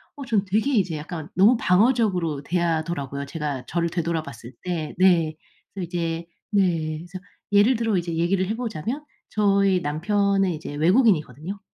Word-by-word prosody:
어 280 Hz, -, -7 dB
저는 215 Hz, -5 st, +1 dB
되게 215 Hz, +9 st, +1 dB
이제 190 Hz, -8 st, +1 dB
약간 155 Hz, +1 st, -7 dB
너무 200 Hz, +8 st, +6 dB
방어적으로 185 Hz, -, +2 dB
대하더라고요. 160 Hz, -4 st, -1 dB
제가 145 Hz, -3 st, -4 dB
저를 170 Hz, 0 st, 0 dB
되돌아 165 Hz, -1 st, -1 dB
봤을 125 Hz, -4 st, -10 dB
때. 170 Hz, -4 st, -3 dB
네. 170 Hz, -4 st, +4 dB, 0.4 s
그래서 190 Hz, -3 st, -3 dB
이제 165 Hz, -1 st, -3 dB, 0.3 s
네 170 Hz, -6 st, +1 dB
그래서 180 Hz, +3 st, -9 dB, 0.3 s
예를 205 Hz, +5 st, +5 dB
들어 225 Hz, -2 st, 0 dB
이제 170 Hz, -1 st, -2 dB
얘기를 180 Hz, +3 st, +1 dB
해 215 Hz, -, -1 dB
보자면 235 Hz, -, -4 dB, 0.2 s
저희 200 Hz, -3 st, +2 dB
남편은 195 Hz, +5 st, +1 dB
이제 155 Hz, -2 st, -6 dB
외국인이거든요. 175 Hz, -, +2 dB
175 Hz, 355 characters per minute, -24 LUFS, 160-200 Hz, 0.4 s, 너무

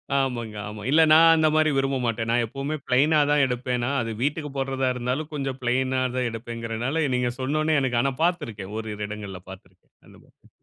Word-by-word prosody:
ஆமாங்க, 120 Hz, -5 st, -1 dB
ஆமா. 105 Hz, 0 st, -8 dB
இல்ல 160 Hz, +3 st, +5 dB
நான் 165 Hz, +1 st, +8 dB
அந்தமாரி 155 Hz, 0 st, +3 dB
விரும்ப 135 Hz, 0 st, +1 dB
மாட்டேன். 115 Hz, 0 st, -2 dB
நான் 120 Hz, 0 st, +2 dB
எப்பவுமே 135 Hz, +6 st, -4 dB
பிளைன்னா 150 Hz, +5 st, +4 dB
தான் 145 Hz, -2 st, +4 dB
எடுப்பேனா, 125 Hz, 0 st, -2 dB
அது 115 Hz, -, -3 dB
வீட்டுக்கு 150 Hz, +2 st, -1 dB
போட்றதா 135 Hz, -1 st, 0 dB
இருந்தாலும் 125 Hz, +6 st, -3 dB
கொஞ்சம் 135 Hz, -2 st, -3 dB
பிளைன்னா 130 Hz, +1 st, 0 dB, 0.2 s
தான் 125 Hz, -1 st, 0 dB
எடுப்பேன்ங்கினால, 115 Hz, +5 st, -3 dB
நீங்க 125 Hz, -1 st, 0 dB
சொன்னவோனே 155 Hz, +3 st, +1 dB
எனக்கு 125 Hz, -3 st, 0 dB
ஆனா 135 Hz, -, +1 dB
பார்த்திருக்கேன். 115 Hz, -, -2 dB
ஓரிரு 110 Hz, -1 st, -5 dB
இடங்கள்ல 100 Hz, -3 st, -7 dB
பார்த்திருக்கேன். 95 Hz, -1 st, -15 dB
அந்த -, -, -17 dB
மாரி. -, -, -26 dB
130 Hz, 170 wpm, -24 LUFS, 115-150 Hz, 0.2 s, நான்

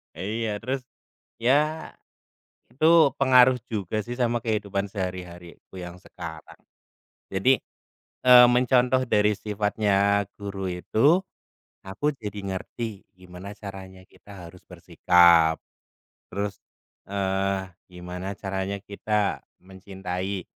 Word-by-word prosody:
Iya. 110 Hz, +2 st, -3 dB
Terus, 130 Hz, +1 st, -2 dB, 0.6 s
ya 150 Hz, +6 st, +1 dB, 0.8 s
itu 155 Hz, 0 st, +5 dB
pengaruh 130 Hz, -1 st, +6 dB, 0.2 s
juga 105 Hz, 0 st, -2 dB
sih, 120 Hz, +1 st, -5 dB
sama 120 Hz, -1 st, +1 dB
kehidupan 100 Hz, -3 st, -1 dB
sehari-hariku 90 Hz, -1 st, -7 dB
yang 90 Hz, 0 st, -8 dB
sekarang. 80 Hz, -5 st, -10 dB, 0.7 s
Jadi, 110 Hz, +8 st, +3 dB, 0.7 s
eee, 125 Hz, -1 st, +9 dB
mencontoh 125 Hz, +1 st, +3 dB
dari 105 Hz, -1 st, +3 dB
sifatnya 100 Hz, -1 st, +1 dB, 0.2 s
guru 100 Hz, -1 st, -5 dB
itu, 135 Hz, -, +2 dB, 0.7 s
aku 105 Hz, +11 st, -1 dB
jadi 105 Hz, -2 st, -6 dB, 0.2 s
ngerti, 110 Hz, +1 st, -7 dB
gimana 90 Hz, +2 st, -10 dB
caranya 95 Hz, -2 st, -10 dB
kita -, -, -22 dB, 0.2 s
harus 90 Hz, +2 st, -16 dB
bersikap. 85 Hz, -2 st, +4 dB, 0.7 s
Terus, 100 Hz, +1 st, -4 dB, 0.5 s
eee, 95 Hz, -1 st, -1 dB, 0.2 s
gimana 90 Hz, +2 st, -6 dB
caranya 95 Hz, 0 st, -3 dB
kita 105 Hz, 0 st, -2 dB, 0.2 s
mencintai, 95 Hz, 0 st, -6 dB
100 Hz, 95 wpm, -25 LUFS, 95-115 Hz, 0.8 s, eee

